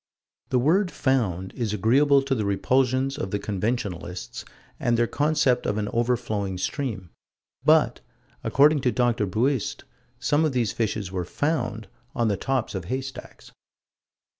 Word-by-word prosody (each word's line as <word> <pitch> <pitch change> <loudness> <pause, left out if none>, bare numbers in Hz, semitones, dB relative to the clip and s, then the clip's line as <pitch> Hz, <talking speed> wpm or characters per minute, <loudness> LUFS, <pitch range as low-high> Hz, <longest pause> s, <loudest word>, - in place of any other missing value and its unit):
The 130 - +2
word 175 +10 +3
"found" 105 - 0
is 115 -5 -2
agreeable 135 +7 +4
to 135 0 -1
the 110 -5 0
repulsions 130 +6 +1
of 95 - -3
the 105 - -1
conventionalists 100 -4 -3 0.4
and 120 -1 +1
their 120 - +3
concept 145 -1 +1
of 105 - 0
an 105 -1 -1
overflowing 110 -5 -1
stream 105 - -3 0.5
but, - - +4 0.4
according 145 +1 +4
to 125 -2 +2
Dr. 120 -4 +1
Buist, 120 +6 0 0.3
some 150 +2 +1
of 155 -3 +1
these 120 -4 +1
fishes 105 -4 -2
were 90 -2 -2
"found" 125 - -2 0.3
on 120 -3 +1
the 100 - +1
tops 135 +2 -1
of 95 -4 -4
haystacks. 130 +3 -6
120 Hz, 140 wpm, -25 LUFS, 105-135 Hz, 0.5 s, agreeable